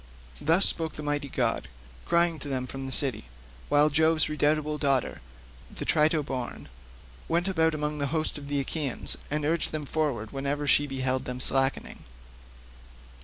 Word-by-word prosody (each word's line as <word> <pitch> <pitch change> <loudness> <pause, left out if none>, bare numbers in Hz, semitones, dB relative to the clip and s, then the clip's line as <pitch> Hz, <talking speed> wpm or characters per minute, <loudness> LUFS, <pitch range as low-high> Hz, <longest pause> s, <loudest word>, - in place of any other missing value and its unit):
Thus 165 +6 +4
spoke 160 -2 +1
the 150 - -8
mighty 145 -1 -2
god, 60 - -1 0.4
crying 170 -1 +2
to - - -6
them 130 -2 -2
from 135 +1 -7
the - - -6
city, 130 - +2 0.4
while 150 +1 +4
Jove's 160 +2 +3
redoubtable 150 0 0
daughter, 135 - 0 0.5
the - - -7
Trito 155 -1 +2
born, 130 - -5 0.6
went 170 +3 0
about 160 -4 +1
among 150 0 -3
the 140 - 0
host 155 0 0
of 140 - -10
the 145 0 -1
Achaeans, 140 -1 +1
and 150 0 -1
urged 165 +2 0
them 155 -1 -4
forward 140 -8 -2
whenever 140 +2 -2
she 145 +1 +3
beheld 130 -1 -1
them 125 0 -5
slackening. 135 +1 +1
145 Hz, 160 wpm, -27 LUFS, 135-155 Hz, 0.6 s, Thus